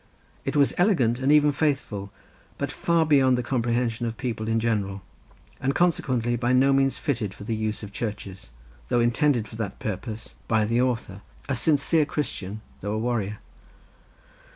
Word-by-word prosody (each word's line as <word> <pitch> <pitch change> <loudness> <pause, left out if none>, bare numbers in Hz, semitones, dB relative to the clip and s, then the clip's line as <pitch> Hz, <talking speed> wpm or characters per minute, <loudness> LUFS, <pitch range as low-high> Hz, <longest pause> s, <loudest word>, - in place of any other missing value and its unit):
It - - -2
was 140 -2 +4
elegant 130 - +3
and 135 +2 +2
even 150 -1 +6
faithful, 135 -10 -1 0.5
but 140 0 -2
far 170 -1 +2
beyond 135 -4 +4
the 125 - -1
comprehension 120 -1 0
of 115 -1 -5
people 110 -3 -3
in 115 0 +2
general, 100 -4 -1 0.6
and 135 +2 0
consequently 130 -9 +1
by 120 +1 +1
no 135 +2 +5
means 135 0 +2
fitted 110 -8 -2
for 105 - -10
the 115 +2 -2
use 110 0 -3
of 100 -1 -8
churches, 100 - -5 0.4
though 120 - +2
intended 120 -1 +2
for 110 - -10
that 105 -3 -4
purpose 110 +2 -5
by 110 -2 +2
the 115 +3 +2
author, 115 -6 -2 0.3
a 135 - 0
sincere 150 +4 +3
Christian, 110 -9 -4 0.2
though 105 +2 -3
a - - -1
warrior. 110 -3 -1
120 Hz, 165 wpm, -25 LUFS, 110-135 Hz, 0.6 s, even